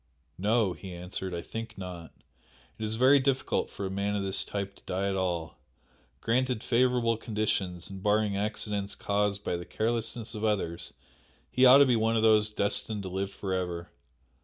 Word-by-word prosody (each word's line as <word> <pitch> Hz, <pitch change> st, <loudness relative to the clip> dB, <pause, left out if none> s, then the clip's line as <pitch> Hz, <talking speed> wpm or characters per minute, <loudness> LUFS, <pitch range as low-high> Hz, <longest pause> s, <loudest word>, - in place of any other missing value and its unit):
"No!" 105 Hz, -1 st, +2 dB
he 90 Hz, +2 st, -9 dB
answered 90 Hz, +2 st, -4 dB
"I 85 Hz, -1 st, -4 dB
think 115 Hz, -1 st, -7 dB
not. 90 Hz, -3 st, -7 dB, 0.7 s
It 110 Hz, -, -2 dB
is 110 Hz, +1 st, -2 dB
very 130 Hz, +4 st, +6 dB
difficult 135 Hz, 0 st, 0 dB
for 100 Hz, -, -5 dB
a 95 Hz, -, -3 dB
man 100 Hz, +1 st, -1 dB
of 100 Hz, -, -1 dB
this 95 Hz, -1 st, +1 dB
type 100 Hz, -1 st, -4 dB
to -, -, -21 dB
die 95 Hz, +2 st, -1 dB
at 100 Hz, -, 0 dB
all. 85 Hz, -5 st, -2 dB, 0.6 s
Granted 125 Hz, 0 st, +1 dB
favourable 120 Hz, -2 st, +2 dB
conditions 100 Hz, -6 st, -1 dB
and 95 Hz, -1 st, -8 dB
barring 105 Hz, 0 st, +2 dB
accidents 100 Hz, -1 st, -2 dB
caused 100 Hz, 0 st, 0 dB
by 85 Hz, -, -1 dB
the 85 Hz, -, -6 dB
carelessness 115 Hz, 0 st, -2 dB
of 110 Hz, -1 st, -5 dB
others 90 Hz, -5 st, -1 dB, 0.6 s
he 130 Hz, 0 st, +6 dB
ought 130 Hz, +2 st, +10 dB
to 140 Hz, -, +7 dB
be 125 Hz, -2 st, +3 dB
one 115 Hz, 0 st, +2 dB
of 110 Hz, -, +1 dB
those 110 Hz, -1 st, +5 dB
destined 105 Hz, 0 st, -1 dB
to 95 Hz, -, -5 dB
live 95 Hz, +1 st, -2 dB
for 100 Hz, -1 st, -4 dB
ever. 90 Hz, -2 st, -3 dB
105 Hz, 185 wpm, -29 LUFS, 95-115 Hz, 0.7 s, ought